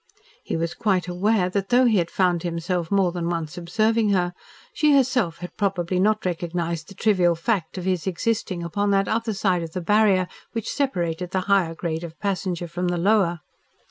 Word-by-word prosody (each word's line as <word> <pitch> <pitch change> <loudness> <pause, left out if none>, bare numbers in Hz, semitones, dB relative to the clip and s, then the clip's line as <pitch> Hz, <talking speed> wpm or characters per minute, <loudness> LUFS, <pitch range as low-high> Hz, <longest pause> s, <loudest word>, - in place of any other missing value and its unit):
He - - -3
was 165 +1 -2
quite 195 -6 0
aware 185 +2 +1
that 195 0 -2
though 250 +1 +5
he 220 -5 +4
had 170 -1 -1
found 180 -2 +1
himself 170 0 -2
more 195 -3 +2
than 170 -1 -3
once 165 -2 -3
observing 215 +5 +1
her, 180 -3 +1 0.4
she 300 -2 +4
herself 250 -10 +2
had 175 0 -8
probably 185 -3 0
not 215 +2 +2
recognised 170 -2 -2
the 195 - -12
trivial 185 -4 +3
fact 170 0 -2
of 180 - -4
his 185 -1 -1
existing 190 -1 -1
upon 205 +5 -1
that 195 0 +2
other 225 -1 -1
side 190 -3 +1
of 165 -1 -6
the 185 - -2
barrier 200 -1 +3 0.3
which 225 -3 -3
separated 180 - -1
the 190 0 -1
higher 185 -4 +2
grade 165 0 -3
of 165 -1 -9
passenger 180 -3 -2
from 175 +2 -3
the 175 0 0
lower. 175 -3 +2
180 Hz, 190 wpm, -24 LUFS, 170-205 Hz, 0.4 s, though